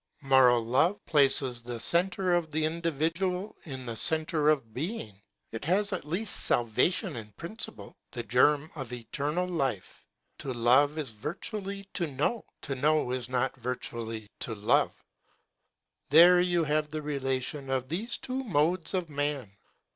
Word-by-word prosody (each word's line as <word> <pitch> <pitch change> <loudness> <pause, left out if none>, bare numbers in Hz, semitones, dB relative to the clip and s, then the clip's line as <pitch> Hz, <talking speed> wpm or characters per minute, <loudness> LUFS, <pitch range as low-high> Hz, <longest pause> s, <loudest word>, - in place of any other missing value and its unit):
Moral 130 -3 +5
love 145 - +1
places 135 -4 +3
the 120 0 -6
centre 180 +5 +2
of 170 -2 +1
the 155 +1 0
individual 170 +4 -1
in 130 -5 -7
the 115 -2 -5
centre 155 +2 +2
of 135 -8 0
being. 150 - -4 0.4
It 110 - -6
has 200 +4 +1
at 180 - -4
least 180 +7 +2
salvation 140 - +1
in 110 -3 -7
principle, 170 - -7 0.2
the - - -5
germ 150 +1 +3
of 135 -6 -7
eternal 140 +9 -2
life. 135 - -3 0.4
To 130 - -4
love 130 +6 +4
is 145 -6 -2
virtually 195 - -5
to 175 -4 -1
know; 150 - -2 0.2
to 140 - -3
know 150 0 +1
is 125 -1 -3
not 130 +1 0
virtually 115 -3 -5
to 115 - -2
love; 105 0 +2 1.2
there 175 +4 +8
you 175 -2 +1
have 150 0 0
the 155 0 -5
relation 135 -1 -3
of 130 -1 -1
these 205 - -2
two 260 +1 -4
modes 175 - 0
of 180 -2 -1
man. 145 -6 -2
150 Hz, 145 wpm, -29 LUFS, 125-175 Hz, 1.2 s, there